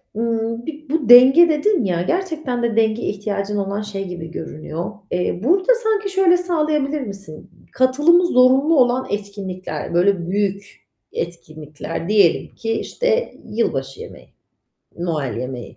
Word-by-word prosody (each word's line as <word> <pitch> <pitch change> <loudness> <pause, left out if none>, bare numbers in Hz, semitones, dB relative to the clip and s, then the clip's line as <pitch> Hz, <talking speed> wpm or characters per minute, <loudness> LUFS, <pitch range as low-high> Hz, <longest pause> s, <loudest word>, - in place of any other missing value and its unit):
ımm, 230 +1 -2
bir 305 -2 -8
bu 295 -4 -1
denge 265 +8 +8
dedin 320 - +1
ya, 180 -4 -1
gerçekten 315 - -2
de 235 -2 0
denge 225 +1 +1
ihtiyacın 205 0 -3
olan 200 +1 -2
şey 200 -2 -5
gibi 175 -2 -8
görünüyor. 160 +2 -6 0.2
Eee, 180 0 -1
burada 375 - +3
sanki 425 -2 0
şöyle 380 -2 +3
sağlayabilir 305 -5 -1
misin? 195 -9 -10 0.2
Katılımı 295 +8 +3
zorunlu 270 +2 +4
olan 250 +1 +2
etkinlikler, 190 -6 -5
böyle, 175 0 +1
büyük 200 0 -3 0.3
etkinlikler, 155 0 -6
diyelim 200 -6 +2
ki, 225 - -4
işte, 480 - -1 0.2
yılbaşı 135 - -2
yemeği, - - -12 0.7
Noel 155 -9 -3
yemeği. 125 -1 -7
225 Hz, 130 wpm, -20 LUFS, 180-300 Hz, 0.7 s, denge